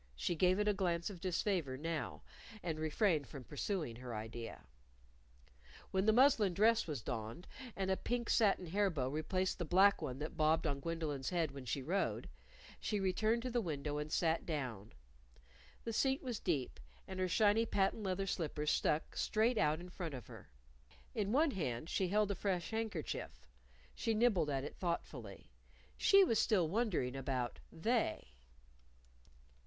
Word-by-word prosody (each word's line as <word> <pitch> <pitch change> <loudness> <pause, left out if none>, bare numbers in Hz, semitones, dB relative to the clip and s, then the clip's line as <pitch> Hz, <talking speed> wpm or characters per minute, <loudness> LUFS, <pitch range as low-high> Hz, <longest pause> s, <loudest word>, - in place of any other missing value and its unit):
She 60 - -1
gave 180 +3 +3
it 210 0 +1
a 210 - +4
glance 175 -2 0
of 180 -4 -10
disfavor 180 -6 0
now, 160 +2 -3 0.4
and 160 -3 -2
refrained 155 - +1
from 140 -4 -9
pursuing 150 - -3
her 125 -2 -6
idea. 115 +2 -6 1.3
When 190 +2 +1
the - - +7
muslin 225 -6 +5
dress 225 +2 +4
was 145 -8 -4
donned, 115 +6 -5 0.3
and 190 -1 -1
a 190 - +2
pink 240 -1 -2
satin 200 -5 +3
hair 200 +4 +2
bow 135 -7 -1
replaced 185 +7 -1
the - - 0
black 195 +5 +5
one 125 - -3
that 150 +2 -5
bobbed 155 +1 +3
on 140 - 0
Gwendolyn's 150 -3 -2
head 170 -5 0
when 135 -2 -8
she 135 +2 -2
rode, 170 - -1 0.5
she 210 - -1
returned 215 +5 +1
to 255 - -3
the 240 0 +1
window 150 -4 -3
and 150 +1 -4
sat 165 0 +1
down. 125 - -4 0.9
The 230 - -3
seat 270 +5 +1
was 245 -5 -3
deep, 145 -8 -1 0.3
and 190 -1 -6
her 185 - +2
shiny 215 +4 +4
patent 195 +2 +1
leather 195 -1 -1
slippers 150 -4 -1
stuck 150 - 0
straight 220 +2 +2
out 150 +1 +2
in 180 +1 -9
front 170 -5 -5
of 125 - -8
her. - - -12 0.6
In 205 -2 -1
one 295 +4 +4
hand 155 - -3
she 190 - +1
held 205 +2 +2
a - - +1
fresh 185 -1 -1
handkerchief. 205 - -4 0.5
She 225 - -1
nibbled 215 -9 +3
at 135 -2 -1
it 145 - -7
thoughtfully. 125 - -4 0.4
She 395 0 +6
was 230 - +2
still 185 -7 +3
wondering 180 - 0
about 130 -2 -2
"They." 220 - 0
175 Hz, 165 wpm, -36 LUFS, 145-205 Hz, 1.3 s, the